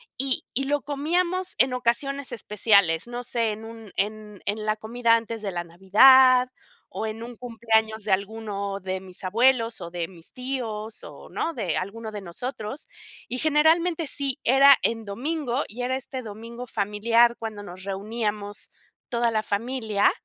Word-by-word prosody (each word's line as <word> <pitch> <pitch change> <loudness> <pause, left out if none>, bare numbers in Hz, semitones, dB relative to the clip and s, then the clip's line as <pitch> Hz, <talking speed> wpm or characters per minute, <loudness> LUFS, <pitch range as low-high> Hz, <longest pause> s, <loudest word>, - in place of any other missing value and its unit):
y 265 0 -1
y 270 +1 0
lo 290 0 0
comíamos 345 +6 -1
en 260 -1 +4
ocasiones 260 +3 -1
especiales, 200 -5 +3
no 245 +1 -5
sé, 230 -3 0
en 220 +1 -9
un 225 -3 -11
en 210 0 -2
en 215 +1 -1
la 215 0 +1
comida 230 +1 +2
antes 230 -1 -3
de 200 -2 -3
la 175 -1 -3
Navidad, 250 +9 +6 0.4
o 220 - -3
en 220 +1 -6
un 240 -1 -9
cumpleaños 220 -2 0
de 205 - -2
alguno 200 -1 -2
de 190 0 -3
mis 185 0 -8
abuelos, 230 +3 +2
o 170 -1 -6
de 175 0 -3
mis 170 -3 -9
tíos 230 -4 -4
o, - - -12
¿no?, 330 - -2
de 210 - -2
alguno 215 +4 -5
de 210 - -5
nosotros, 215 - -5 0.4
y 250 - -2
generalmente, 320 +2 +3
sí, 280 0 +1
era 275 +2 +7
en 225 -1 0
domingo, 265 +4 -2
y 245 +4 -5
era 260 +1 0
este 265 0 -5
domingo 230 +3 -8
familiar 230 +3 +2
cuando 215 -2 -6
nos 185 0 -10
reuníamos 205 +1 -3 0.3
toda 235 -2 +1
la 215 -1 +1
familia, 220 -1 +1
230 Hz, 165 wpm, -25 LUFS, 205-255 Hz, 0.4 s, era